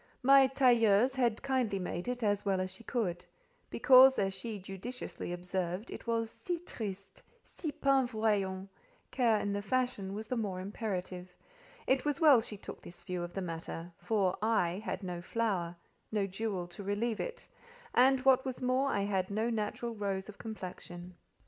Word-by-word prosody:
My 270 +1 +7
tailleuse 245 -3 +4
had 240 -3 +1
kindly 255 -7 +1
made 180 0 -4
it 250 -1 -2
as 205 -1 +1
well 195 -2 +1
as 185 0 -2
she 190 +5 -11
could: 200 -8 -2 0.5
because, 265 0 +7
as 195 -1 +1
she 225 +1 -5
judiciously 195 +2 -6
observed, 180 +3 -3
it - - -8
was 230 -1 0
"si 355 -3 -3
triste—si 215 - -7
pen 270 -2 +3
voyant," 205 -5 0 0.4
care 230 -5 +3
in 205 -1 -1
the 205 - -1
fashion 210 -3 -1
was 215 +1 -5
the 250 - -2
more 200 -6 -2
imperative: 185 -3 -5 0.5
it 265 -1 +2
was 295 0 -1
well 295 -8 +7
she 215 -1 -7
took - - -9
this 175 - -12
view 180 -1 -3
of 175 0 -5
the 195 - -2
matter, 165 0 -6
for 195 -5 +1
I, 205 -4 +1
had 200 -2 -4
no 175 -2 -4
flower, 185 -4 -1 0.4
no 210 -2 +1
jewel 195 -1 -3
to 175 - -9
relieve 205 +3 -1
it: - - -5 0.5
and, 265 - +5
what 260 -1 +6
was 260 -2 -4
more, 255 +2 +1
I 200 - 0
had 195 -2 0
no 220 +3 0
natural 225 +2 -2
rose 195 -3 -3
of 210 - -11
complexion. 180 -4 -8
210 Hz, 170 wpm, -32 LUFS, 190-245 Hz, 0.5 s, My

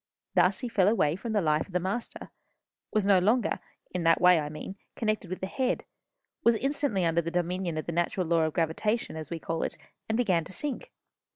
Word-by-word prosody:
Thus - - +3
he 250 - -2
fell 195 -5 +3
away 165 -8 +3
from 220 +4 -4
the 205 -3 +2
life 155 -1 +1
of 190 - -16
the 180 - +2
Master; 195 +7 -4 0.6
was 215 -2 +1
no 195 -2 +6
longer, 215 +5 +2 0.3
in 180 - -1
that 165 0 +4
way 180 -2 +6
I 150 -1 -3
mean, 155 +5 -7 0.2
connected 215 -4 -1
with 185 - -5
the - - -1
Head, 255 +6 -1 0.6
was 235 - +5
instantly 275 -7 0
under 165 0 +2
the 170 - -3
dominion 175 -1 -1
of 155 - -3
the - - -3
natural 175 +2 0
law 165 0 +2
of 155 - -2
gravitation, 175 +6 0
as 155 -2 -6
we 170 - -3
call 165 0 -3
it, - - -2 0.3
and 220 - +1
began 185 -9 +2
to - - -11
sink. 295 - -4
185 Hz, 215 wpm, -28 LUFS, 165-215 Hz, 0.6 s, no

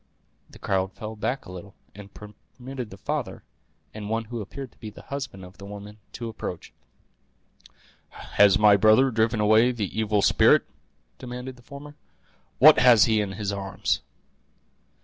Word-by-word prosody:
The - - -15
crowd 95 -1 -2
fell 110 0 -8
back 125 +5 -3
a - - -10
little, 95 +2 -11 0.2
and 100 0 -12
permitted 125 +4 -10
the 95 - -12
father, - - -4 0.5
and 105 -1 -7
one 115 +1 -1
who 115 0 -6
appeared 130 +6 -8
to - - -30
be 110 - -8
the 105 - -14
husband 135 -9 -7
of 90 +3 -16
the 100 - -10
woman, 105 +1 -10
to 120 - -6
approach. 110 -6 -7 1.4
"Has 100 -2 +2
my 105 -1 +5
brother 110 +6 +4
driven 110 -1 0
away 110 +3 +4
the 105 -6 -5
evil 105 -2 0
spirit?" - - +4 0.5
demanded 125 +1 -7
the 125 - -19
former. 145 +3 -12 0.6
"What 155 +4 +7
has 125 -4 +6
he 110 -2 +2
in 100 -2 -4
his 100 0 -4
arms?" 95 -1 -2
110 Hz, 160 wpm, -25 LUFS, 100-125 Hz, 1.4 s, What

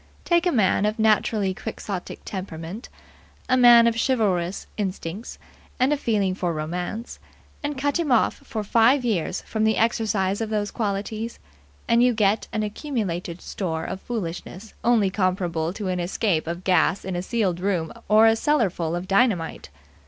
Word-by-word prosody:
Take 345 0 +3
a - - +3
man 210 - +2
of 215 - -2
naturally 215 -2 +2
quixotic 200 -2 -6
temperament, 185 +2 -6 0.6
a 255 - +3
man 240 -2 +8
of 230 -1 +2
chivalrous 195 -8 0
instincts 195 0 -4 0.4
and 260 +4 +3
a - - +3
feeling 210 -9 0
for 180 -2 -2
romance, 175 +9 -4 0.4
and 290 -1 -3
cut 285 +4 0
him 315 -5 -1
off 240 - +4
for 215 -2 -5
five 235 +5 +3
years 190 -5 -1
from 220 -1 -2
the 220 0 +2
exercise 215 -3 +1
of 220 - -2
those 210 -2 -1
qualities, 215 +1 -3 0.5
and 235 0 +4
you 245 -1 +4
get 210 0 +2
an 215 - -1
accumulated 205 - -4
store 160 -5 -3
of 190 - -5
foolishness 200 -1 -6
only 225 -5 +3
comparable 180 -4 0
to 200 +1 -5
an 180 -1 -1
escape 175 -1 0
of 170 +2 -4
gas 185 +1 +2
in 190 -1 -3
a 175 - -1
sealed 190 -3 -1
room 180 -4 -1 0.2
or 215 +1 +6
a 225 0 +5
cellarful 195 - 0
of 175 +2 -4
dynamite. 195 -5 +1
205 Hz, 160 wpm, -24 LUFS, 180-230 Hz, 0.6 s, man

